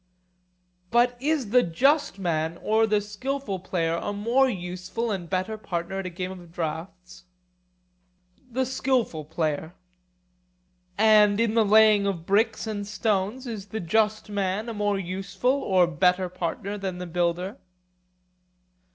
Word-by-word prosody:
But 240 +2 +3
is 285 -7 0
the 250 +1 +6
just 270 - +2
man 165 -3 -1
or 220 +1 +3
the 210 -1 +3
skilful 210 +1 -4
player 170 -2 -1
a 190 - -3
more 235 +6 +2
useful 185 +3 -4
and 180 -4 -4
better 190 +4 -2
partner 180 0 -3
at 190 - -4
a - - -3
game 180 +1 -5
of 175 -3 -11
draughts? 175 +3 -6 1.3
The 260 +2 0
skilful 250 - -1
player. 160 +1 -2 1.2
And 210 -1 +5
in 230 -1 +2
the 225 -1 +4
laying 215 -1 +5
of 175 -4 -3
bricks 220 +4 +1
and 205 -2 -4
stones 210 +3 -1
is 215 -5 -6
the 220 - -4
just 215 +5 +1
man 205 +2 -2
a - - -4
more 205 -1 0
useful 195 +5 -1
or 185 -2 +4
better 180 +3 +2
partner 185 +3 -4
than 190 -2 -4
the 180 - -5
builder? 175 +5 -1
200 Hz, 140 wpm, -26 LUFS, 180-220 Hz, 1.3 s, the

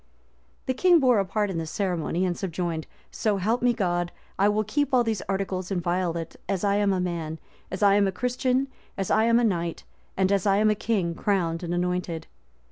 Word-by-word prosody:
The 260 - 0
king 350 +5 +5
bore 250 -6 +4
a 195 - +1
part 205 +1 -1
in 170 - -2
this 160 -1 -4
ceremony, 180 -1 -1
and 180 -1 -1
subjoined, 170 -3 -3 0.2
"So 210 -2 0
help 220 +6 0
me 245 0 +4
God, 175 -5 -1 0.3
I 200 +1 +5
will 210 +1 +1
keep 275 +6 0
all 245 - +5
these 225 -4 -1
articles 190 -1 -2
inviolate, 175 -2 -2
as 195 -2 -1
I 200 0 +2
am 205 -1 +2
a 190 - +1
man, 170 -3 -3 0.3
as 185 +3 -3
I 200 -1 +6
am 200 0 +4
a - - 0
Christian, 250 +4 0 0.3
as 195 - -2
I 220 +1 +4
am 230 0 +4
a - - +1
knight, 170 -6 -1 0.3
and 190 0 +2
as 200 0 +2
I 195 0 +4
am 215 +1 +4
a - - +4
king 200 -6 -1
crowned 165 -3 0
and 175 -1 -4
anointed." 175 -2 -2
195 Hz, 210 wpm, -26 LUFS, 175-215 Hz, 0.3 s, I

